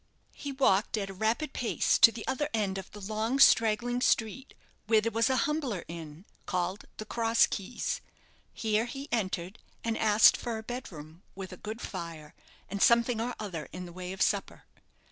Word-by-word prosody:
He 285 - -6
walked 230 -6 +2
at 195 -2 -3
a - - -9
rapid 225 +9 -1
pace 240 - +1
to 230 - +9
the 220 -1 -8
other 295 +3 -1
end 195 -3 -1
of 190 - -10
the 210 - -11
long, 215 +5 -1
straggling 240 -1 +4
street, 245 +3 0 0.3
where 220 0 +5
there 230 +2 -1
was 230 +2 +2
a 260 - +2
humbler 285 - -2
inn, 165 +1 -9 0.2
called 185 +2 -2
the 215 - -6
"Cross 230 +1 +3
Keys." 200 +4 -3 0.5
Here 220 0 0
he 275 +3 -7
entered, 190 -3 -2 0.2
and 230 -1 -1
asked 215 -1 +6
for 235 -2 -4
a 220 - -7
bed 245 +1 -6
room, 155 +1 -11
with 190 -1 -7
a - - -7
good 220 +5 -7
fire, 165 -5 -7 0.3
and 200 +1 -5
something 235 -1 +4
or 245 +1 -3
other 185 -8 -5
in 180 +1 -7
the 175 - -11
way 180 0 -6
of 190 - 0
supper. - - -1
215 Hz, 185 wpm, -29 LUFS, 190-235 Hz, 0.5 s, to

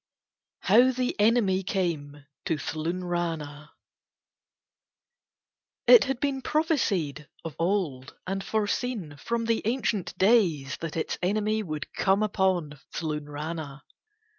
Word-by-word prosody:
HOW 235 +6 +6
THE 255 0 -1
ENEMY 205 -3 +3
CAME 155 -7 -3 0.2
TO 160 - 0
THLUNRANA 165 -1 -3 2.2
It 485 - +8
had 270 -2 -2
been 275 -2 -1
prophesied 200 - 0 0.2
of 160 -3 -5
old 165 -8 -1
and 195 +1 -3
foreseen 210 - -2
from 230 +9 -2
the 230 -1 +1
ancient 220 -5 -1
days 180 - +3
that 165 -1 -5
its 160 - -2
enemy 215 +3 +1
would 155 -7 -5
come 195 +2 +2
upon 185 -8 0
Thlunrana. 150 -1 -5
185 Hz, 105 wpm, -27 LUFS, 150-220 Hz, 2.2 s, It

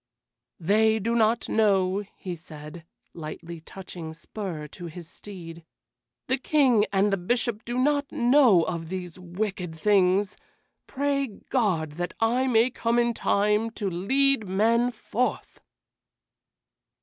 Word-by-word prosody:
"They 215 +5 +3
do 225 +2 -1
not 230 +1 +2
know," 200 -2 +2
he 180 -2 -5
said, 155 0 -11 0.3
lightly 165 +1 -8
touching 170 -2 -9
spur 170 -3 -6
to 175 +3 -9
his 170 0 -9
steed. 170 -3 -10 0.6
"The 260 - 0
King 255 -7 +3
and 200 +1 +2
the - - +2
Bishop 225 +4 -1
do 240 +1 -3
not 285 +2 +1
know 245 - +5
of 165 -1 -4
these 180 -1 -6
wicked 180 -1 -4
things. 195 +2 +2 0.5
Pray 280 0 0
God 200 - -1
that 175 0 -3
I 245 +4 +2
may 240 0 +3
come 235 -1 0
in 235 0 +2
time 210 +1 +1
to 200 -3 -2
lead 265 +6 +1
men 230 +6 +2
forth!" 245 +1 -3
205 Hz, 125 wpm, -26 LUFS, 175-235 Hz, 0.6 s, know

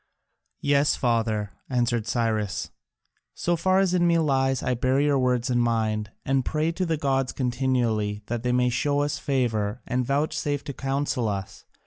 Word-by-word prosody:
"Yes, 145 0 +3
father," 110 -4 0 0.2
answered 120 -3 0
Cyrus, 105 -3 -1 0.6
"so 175 - 0
far 185 +3 +2
as 190 -2 +2
in 175 -1 +3
me 170 0 +4
lies, 135 -4 +1
I 125 - +1
bear 130 +2 +1
your 145 -1 +3
words 125 0 +1
in 120 - +2
mind, 110 -3 0 0.2
and 135 0 +1
pray 155 +4 0
to 185 +1 -2
the 160 -1 0
gods 135 -3 0
continually 120 -5 0
that 120 0 -3
they 125 +1 0
may 125 0 +3
show 145 +4 +1
us 145 +1 -1
favour 120 -5 -1
and 125 +1 0
vouchsafe 145 +1 -1
to 140 - -6
counsel 135 -3 -1
us. 100 -2 -5
125 Hz, 165 wpm, -25 LUFS, 115-145 Hz, 0.6 s, me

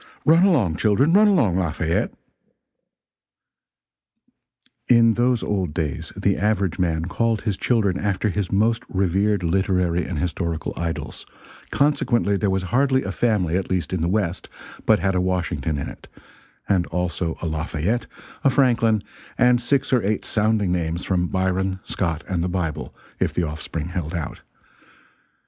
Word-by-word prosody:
Run 165 +4 +6
along, 110 - +2
children, 130 +10 +3
run 210 +2 +6
along; 125 - +3
Lafayette, 85 -1 -1 2.8
[In 115 -1 +5
those 120 0 +1
old 95 -7 -2
days 75 -5 -3
the 100 -1 +1
average 100 -4 0
man 80 -2 0
called 115 +4 0
his 105 -4 -1
children 100 -4 +1
after 105 +1 0
his 100 -1 -2
most 115 +4 +2
revered 95 +1 +1
literary 90 -1 +1
and 90 - -4
historical 85 0 -2
idols; 85 -1 -4 0.5
consequently 125 -7 +1
there 100 0 0
was 95 0 0
hardly 130 +6 +2
a 95 - -3
family, 100 -7 +1
at 95 - -3
least 95 -1 -1
in 90 - -1
the 85 - +1
West, 95 -2 -1 0.4
but 110 - +6
had 95 +1 0
a 90 - +1
Washington 85 -5 -1
in 70 - -4
it - - -11 0.6
and 95 -4 +1
also 85 -1 -2
a - - -5
Lafayette, 80 +7 -2 0.4
a 140 - +5
Franklin, 115 -5 +2 0.3
and 125 0 +4
six 135 +2 0
or 125 - +4
eight 105 +1 -1
sounding 105 -3 +1
names 85 -1 -2
from 90 -2 0
Byron, 95 +1 -1
Scott, 85 -4 -2
and 90 -3 -1
the 90 - -1
Bible, 80 -4 -3 0.3
if - - 0
the 90 - +1
offspring 80 +1 -4
held 85 -1 -4
out. 80 - -5
95 Hz, 150 wpm, -22 LUFS, 85-110 Hz, 2.8 s, Run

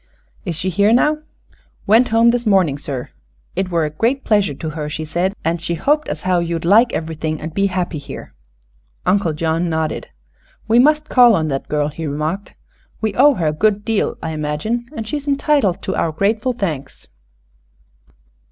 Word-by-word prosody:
"Is 175 -4 -2
she 185 +4 -1
here 200 +5 +3
now?" 300 +6 +3 0.7
"Went 225 +5 +5
home 230 +1 +4
this 240 -1 -2
mornin', 180 -9 +3
sir. 135 -4 -5 0.4
It 190 +1 -1
were 170 -3 +1
a 150 - -3
great 235 - 0
pleasure 205 -9 +2
to 160 - -5
her, 150 -1 -4
she 155 +1 -4
said, 180 +5 -1
an' 165 +1 0
she 170 +1 -2
hoped 295 - +1
as - - -4
how 185 -1 +1
you'd 170 -1 -2
like 225 +6 +5
everything, 160 -1 -3
an' 160 - -5
be 195 +5 +1
happy 180 -4 -2
here." - - -9 0.7
Undo 195 -4 +2
John 160 +2 -1
nodded. 160 -1 -2 0.6
"We 230 +2 +4
must 300 +3 +4
call 245 -5 +6
on 160 -3 0
that 135 -1 -3
girl," 150 -1 0
he 155 +1 -6
remarked. 155 +7 -3 0.4
"We 220 -2 -1
owe 280 +5 +5
her 165 -6 0
a - - -2
good 210 +5 +1
deal, 225 -2 0
I 160 - -3
imagine, 155 +11 -2
and 220 -1 -4
she's 290 +5 -4
entitled 280 - +1
to 190 - -2
our 165 - 0
grateful 215 +9 0
thanks." 165 - -5
185 Hz, 180 wpm, -19 LUFS, 160-225 Hz, 0.7 s, call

